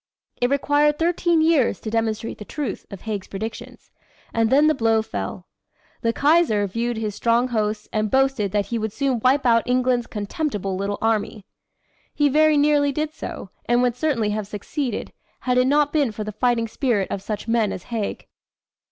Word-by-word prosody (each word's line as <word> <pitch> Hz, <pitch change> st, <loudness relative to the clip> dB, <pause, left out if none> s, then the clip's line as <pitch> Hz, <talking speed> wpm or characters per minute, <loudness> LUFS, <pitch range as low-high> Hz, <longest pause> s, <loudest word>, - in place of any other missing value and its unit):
It 245 Hz, -, +1 dB
required 290 Hz, +1 st, +2 dB
thirteen 340 Hz, 0 st, +2 dB
years 315 Hz, -6 st, +3 dB
to 220 Hz, -, -5 dB
demonstrate 225 Hz, 0 st, -2 dB
the -, -, -6 dB
truth 270 Hz, -1 st, -5 dB
of 195 Hz, -, -9 dB
Haig's 210 Hz, -3 st, -4 dB
predictions, 220 Hz, +3 st, -7 dB, 0.4 s
and 225 Hz, -1 st, +2 dB
then 285 Hz, +4 st, +5 dB
the 310 Hz, -, +4 dB
blow 225 Hz, -4 st, +2 dB
fell. 100 Hz, -, -5 dB, 0.6 s
The 230 Hz, -, +1 dB
Kaiser 285 Hz, -7 st, +3 dB
viewed 230 Hz, +4 st, -2 dB
his 215 Hz, -2 st, -2 dB
strong 235 Hz, +4 st, +1 dB
hosts 215 Hz, -2 st, -1 dB
and 215 Hz, 0 st, 0 dB
boasted 265 Hz, -6 st, +1 dB
that 205 Hz, 0 st, +1 dB
he 235 Hz, +2 st, -3 dB
would 220 Hz, -1 st, -2 dB
soon 265 Hz, 0 st, 0 dB
wipe 260 Hz, +4 st, +2 dB
out 230 Hz, -1 st, +5 dB
England's 250 Hz, -1 st, +1 dB
"contemptible 205 Hz, -2 st, -3 dB
little 200 Hz, +2 st, -2 dB
army." 215 Hz, -2 st, -1 dB, 0.7 s
He 295 Hz, -1 st, +3 dB
very 310 Hz, +2 st, +4 dB
nearly 290 Hz, -1 st, +3 dB
did 305 Hz, +2 st, -2 dB
so, 190 Hz, -, -7 dB
and 240 Hz, +1 st, +2 dB
would 245 Hz, -2 st, +1 dB
certainly 250 Hz, -7 st, 0 dB
have 210 Hz, -1 st, -3 dB
succeeded, 220 Hz, +4 st, -4 dB, 0.3 s
had 250 Hz, 0 st, +2 dB
it 255 Hz, -, +3 dB
not 290 Hz, +1 st, +2 dB
been 285 Hz, -7 st, +2 dB
for 215 Hz, 0 st, -5 dB
the 215 Hz, -, -5 dB
fighting 230 Hz, +1 st, +1 dB
spirit 225 Hz, -4 st, 0 dB
of 195 Hz, -, -3 dB
such 210 Hz, +2 st, -5 dB
men 225 Hz, -3 st, +2 dB
as 180 Hz, -, -6 dB
Haig. 215 Hz, -3 st, -3 dB
230 Hz, 180 wpm, -22 LUFS, 215-280 Hz, 0.7 s, then